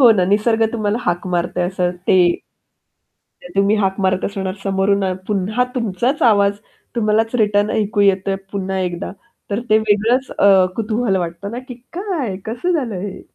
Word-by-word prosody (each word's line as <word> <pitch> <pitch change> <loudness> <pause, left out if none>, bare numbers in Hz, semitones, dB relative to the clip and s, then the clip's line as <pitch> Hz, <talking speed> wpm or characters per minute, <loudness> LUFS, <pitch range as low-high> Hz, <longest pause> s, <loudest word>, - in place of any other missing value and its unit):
हो 245 -3 +8
ना, 190 -4 +2
निसर्ग 215 +4 +2
तुम्हाला 215 -1 -1
हाक 175 -3 -1
मारतोय 175 0 -1
असं 180 -1 -1 0.2
ते - - +5 1.4
तुम्ही 200 +2 +3
हाक 195 -1 0
मारत 190 -1 +1
असणार 190 -2 -3
समोरून 195 0 +1 0.2
पुन्हा 210 +4 0
तुमचाच 235 +4 -1
आवाज 200 -3 +4 0.4
तुम्हालाच 225 +1 +1
रिटर्न 205 -2 +2
ऐकू 210 -2 0
येतोय, 195 0 +2 0.2
पुन्हा 190 -1 -2
एकदा 180 -1 -3 0.4
तर 205 +1 -1
ते 215 - +6
वेगळंच 220 +5 +1
अ, 195 -2 +6
कुतूहल 220 -1 0
वाटतं 175 +3 -4
ना 240 - -4
की 250 - -6 0.2
"काय? 340 - -2
कसं 245 +11 -2
झालं 255 - -1
हे?" 195 -1 -6
205 Hz, 155 wpm, -19 LUFS, 190-225 Hz, 1.4 s, हो